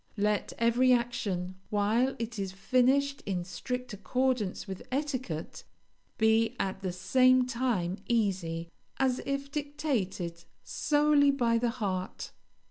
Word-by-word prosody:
Let 210 Hz, 0 st, +1 dB
every 240 Hz, +2 st, +4 dB
action, 195 Hz, -7 st, -1 dB
while 220 Hz, +6 st, +2 dB
it 230 Hz, -1 st, -4 dB
is 190 Hz, -1 st, -3 dB
finished 265 Hz, +6 st, +2 dB
in 185 Hz, -3 st, -1 dB
strict 250 Hz, +7 st, -5 dB
accordance 240 Hz, 0 st, -1 dB
with 190 Hz, -1 st, -6 dB
etiquette, 255 Hz, -, -3 dB, 0.5 s
be, 220 Hz, 0 st, +3 dB
at 190 Hz, 0 st, -2 dB
the 185 Hz, -2 st, -2 dB
same 255 Hz, +8 st, +4 dB
time, 235 Hz, -8 st, -1 dB
easy, 180 Hz, -7 st, 0 dB, 0.3 s
as 260 Hz, -2 st, +1 dB
if 275 Hz, 0 st, -2 dB
dictated 230 Hz, -, -2 dB, 0.2 s
solely 295 Hz, -1 st, +3 dB
by 240 Hz, -4 st, +2 dB
the 240 Hz, 0 st, +1 dB
heart. 195 Hz, -6 st, -3 dB
230 Hz, 120 wpm, -30 LUFS, 190-255 Hz, 0.5 s, every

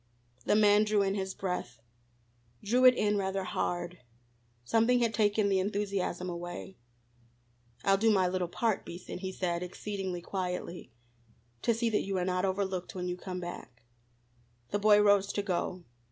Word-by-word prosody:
The -, -, +3 dB
man 210 Hz, 0 st, +5 dB
drew 210 Hz, -1 st, +2 dB
in 195 Hz, 0 st, 0 dB
his 190 Hz, -1 st, -3 dB
breath, 180 Hz, -10 st, -4 dB, 0.8 s
drew 245 Hz, +5 st, +3 dB
it 255 Hz, -1 st, +8 dB
in 210 Hz, -2 st, +1 dB
rather 190 Hz, 0 st, -1 dB
hard; 175 Hz, -1 st, -3 dB, 0.6 s
something 230 Hz, -, +3 dB
had 230 Hz, -2 st, +1 dB
taken 210 Hz, -1 st, +2 dB
the 195 Hz, -1 st, +2 dB
enthusiasm 195 Hz, -2 st, -2 dB
away. 175 Hz, +2 st, -6 dB, 1.1 s
"I'll 195 Hz, 0 st, +3 dB
do 225 Hz, +2 st, +4 dB
my 190 Hz, -4 st, +4 dB
little 180 Hz, -1 st, -1 dB
part, 220 Hz, +4 st, 0 dB
Beason," 175 Hz, +1 st, -8 dB
he 190 Hz, 0 st, -4 dB
said, 175 Hz, -2 st, -2 dB
exceedingly 185 Hz, 0 st, -4 dB
quietly, 180 Hz, -2 st, -4 dB, 0.7 s
"to 235 Hz, -, +2 dB
see 230 Hz, 0 st, 0 dB
that 210 Hz, -, +2 dB
you 195 Hz, -1 st, -2 dB
are 180 Hz, -, 0 dB
not 180 Hz, 0 st, 0 dB
overlooked 190 Hz, -1 st, -2 dB
when 180 Hz, -1 st, -3 dB
you 180 Hz, -, -2 dB
come 180 Hz, 0 st, -6 dB
back." 130 Hz, -9 st, -8 dB, 0.9 s
The 205 Hz, -, 0 dB
boy 210 Hz, 0 st, +6 dB
rose 205 Hz, -1 st, +4 dB
to 205 Hz, -, -1 dB
go. 180 Hz, -1 st, -2 dB
195 Hz, 160 wpm, -30 LUFS, 180-210 Hz, 1.1 s, it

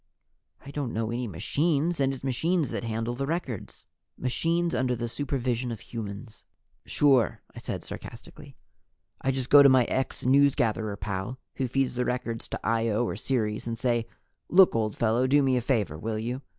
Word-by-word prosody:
"I 140 Hz, -, -8 dB
don't 140 Hz, -4 st, -3 dB
know 110 Hz, 0 st, -1 dB
any 120 Hz, +1 st, -2 dB
machines. 150 Hz, -, 0 dB
And 135 Hz, -1 st, +2 dB
it's 135 Hz, -1 st, -7 dB
machines 150 Hz, +4 st, 0 dB
that -, -, -3 dB
handle 115 Hz, +1 st, -2 dB
the 135 Hz, +3 st, -3 dB
records." 145 Hz, -, -4 dB, 0.3 s
"Machines 165 Hz, +7 st, 0 dB
under 125 Hz, -1 st, +1 dB
the 120 Hz, 0 st, -3 dB
supervision 125 Hz, -2 st, -2 dB
of 115 Hz, -, -5 dB
humans." 105 Hz, -2 st, -8 dB, 0.4 s
"Sure," 135 Hz, -7 st, +3 dB
I -, -, -7 dB
said -, -, -5 dB
sarcastically. -, -, -10 dB, 0.7 s
"I 135 Hz, -, 0 dB
just 130 Hz, -1 st, -2 dB
go 145 Hz, -, +10 dB
to 140 Hz, -, +8 dB
my 130 Hz, -1 st, +6 dB
ex 130 Hz, +3 st, -2 dB
newsgatherer 120 Hz, -6 st, +2 dB
pal 100 Hz, +5 st, -4 dB, 0.2 s
who 130 Hz, -, 0 dB
feeds 135 Hz, +1 st, 0 dB
the 125 Hz, 0 st, -1 dB
records 125 Hz, -2 st, -3 dB
to -, -, -5 dB
Io 115 Hz, 0 st, +1 dB
or -, -, -3 dB
Ceres 110 Hz, -5 st, -2 dB
and 115 Hz, -1 st, -3 dB
say, 120 Hz, -2 st, 0 dB, 0.4 s
'Look, 185 Hz, -4 st, +6 dB
old 110 Hz, -2 st, 0 dB
fellow, 115 Hz, +3 st, +2 dB
do 145 Hz, +2 st, +4 dB
me 130 Hz, -1 st, +3 dB
a 125 Hz, -, +1 dB
favor, 105 Hz, -, 0 dB
will 110 Hz, +4 st, -3 dB
you? 120 Hz, +4 st, -3 dB
125 Hz, 175 wpm, -27 LUFS, 115-135 Hz, 0.7 s, go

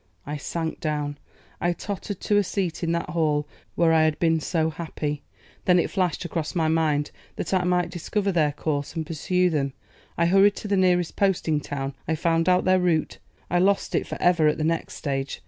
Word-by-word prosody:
I 150 Hz, -, -4 dB
sank 160 Hz, +2 st, -4 dB
down; 145 Hz, -2 st, -2 dB, 0.4 s
I 175 Hz, +1 st, +1 dB
tottered 200 Hz, +2 st, -5 dB
to 205 Hz, -, +2 dB
a 205 Hz, -, +4 dB
seat 180 Hz, -3 st, -2 dB
in 165 Hz, -, +1 dB
that 170 Hz, -2 st, -2 dB
hall 150 Hz, -3 st, +1 dB, 0.3 s
where 165 Hz, -1 st, +4 dB
I 160 Hz, -, +5 dB
had 155 Hz, -1 st, +2 dB
been 165 Hz, -1 st, +2 dB
so 160 Hz, 0 st, 0 dB
happy. 150 Hz, -3 st, -4 dB, 0.4 s
Then 180 Hz, -1 st, +5 dB
it 175 Hz, -, +1 dB
flashed 180 Hz, -3 st, 0 dB
across 165 Hz, -2 st, -3 dB
my 165 Hz, -2 st, +2 dB
mind 155 Hz, -2 st, +1 dB, 0.2 s
that -, -, -3 dB
I 185 Hz, -1 st, +3 dB
might 180 Hz, -1 st, +1 dB
discover 195 Hz, +3 st, -1 dB
their 155 Hz, -5 st, +2 dB
course 145 Hz, 0 st, -3 dB
and 160 Hz, -1 st, -2 dB
pursue 180 Hz, +3 st, +1 dB
them. 140 Hz, -3 st, -1 dB, 0.4 s
I 170 Hz, -, +3 dB
hurried 195 Hz, +3 st, +5 dB
to -, -, -6 dB
the 200 Hz, -, +1 dB
nearest 180 Hz, -2 st, +2 dB
posting 175 Hz, -6 st, +2 dB
town. 140 Hz, -1 st, -4 dB
I 160 Hz, -, +1 dB
found 165 Hz, +2 st, +1 dB
out 180 Hz, 0 st, +3 dB
their 185 Hz, 0 st, +4 dB
route. 170 Hz, -3 st, 0 dB, 0.3 s
I 175 Hz, -, +1 dB
lost 195 Hz, +2 st, +2 dB
it -, -, 0 dB
for -, -, -6 dB
ever 175 Hz, -3 st, +4 dB
at 150 Hz, -, +2 dB
the 155 Hz, -, -2 dB
next 165 Hz, +1 st, -1 dB
stage. 135 Hz, -2 st, -3 dB
165 Hz, 205 wpm, -25 LUFS, 155-180 Hz, 0.4 s, I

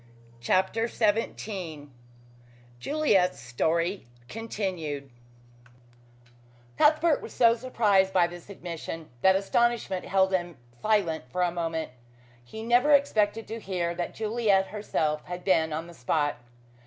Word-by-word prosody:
CHAPTER 190 Hz, -, +1 dB
XVII 200 Hz, -9 st, -2 dB, 0.9 s
JULIET'S 205 Hz, -, +2 dB
STORY 165 Hz, -, -1 dB, 0.2 s
CONTINUED 180 Hz, -, -4 dB, 1.6 s
Cuthbert 310 Hz, -, +4 dB
was -, -, -9 dB
so 230 Hz, -1 st, +5 dB
surprised 215 Hz, -6 st, +2 dB
by 180 Hz, -2 st, +4 dB
this 175 Hz, +2 st, -9 dB
admission 165 Hz, -4 st, -7 dB
that 190 Hz, 0 st, +5 dB
astonishment 210 Hz, -1 st, 0 dB
held 190 Hz, 0 st, +2 dB
him 175 Hz, -4 st, -1 dB, 0.2 s
silent 195 Hz, -9 st, +1 dB
for 180 Hz, +8 st, 0 dB
a 175 Hz, -, +1 dB
moment. 165 Hz, -3 st, -3 dB, 0.5 s
He 220 Hz, -, -8 dB
never 245 Hz, +6 st, +4 dB
expected 225 Hz, -6 st, +2 dB
to 225 Hz, +1 st, -5 dB
hear 180 Hz, -4 st, -2 dB
that 175 Hz, 0 st, -4 dB
Juliet 215 Hz, -3 st, +1 dB
herself 160 Hz, -7 st, -1 dB
had 180 Hz, 0 st, -6 dB
been 160 Hz, -4 st, +2 dB
on 160 Hz, +2 st, -3 dB
the 170 Hz, -, -12 dB
spot. 145 Hz, +1 st, -1 dB
190 Hz, 115 wpm, -27 LUFS, 165-220 Hz, 1.6 s, so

